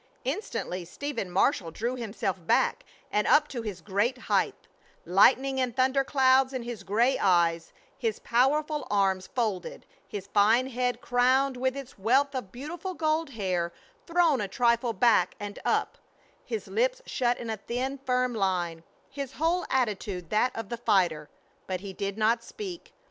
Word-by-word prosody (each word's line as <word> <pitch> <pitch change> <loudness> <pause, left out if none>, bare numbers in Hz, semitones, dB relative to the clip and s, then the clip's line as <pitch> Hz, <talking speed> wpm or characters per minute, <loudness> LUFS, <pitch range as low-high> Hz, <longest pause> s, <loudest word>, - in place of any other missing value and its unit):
Instantly 265 - -3
Stephen 230 +3 -5
Marshall 175 -1 +1
drew 235 +9 -3
himself 220 -5 -3
back, - - +2 0.3
and 210 0 +1
up 300 0 +5
to 245 -5 -5
his 210 -5 -6
great 210 +6 0
height, - - 0 0.5
lightning 265 +9 +4
and 245 -2 -1
thunder 265 +1 +3
clouds 265 -1 +3
in 255 -2 -3
his 240 -2 -6
gray 230 +6 +2
eyes, 170 -3 +2 0.3
his 225 -5 -1
powerful 295 +5 +1
arms 190 -2 +1
folded, 215 -8 -3 0.2
his 195 0 -6
fine 215 +5 +4
head 250 0 -1
crowned 255 +2 +2
with 260 +2 -1
its 275 -6 -9
wealth 265 +8 +3
of 250 -8 -5
beautiful 340 +8 -6
gold 315 -1 0
hair 185 -8 -2 0.4
thrown 335 -6 +3
a 205 - -2
trifle 235 +3 +1
back 205 -3 +3
and 205 0 -6
up, - - 0 0.4
his 450 - -5
lips - - 0
shut 245 -1 0
in 230 -2 -5
a 220 - -3
thin, 255 +6 -3
firm 255 -1 0
line, 180 -6 -1 0.3
his 275 -1 -5
whole 335 +3 0
attitude 205 -8 -1
that 230 +4 +3
of 225 -3 -5
the 235 - -3
fighter; 175 -9 +1 0.4
but 185 -1 -3
he 195 -1 -7
did 200 +2 -4
not 225 +2 +2
speak. 375 - -8
240 Hz, 160 wpm, -28 LUFS, 200-270 Hz, 0.5 s, up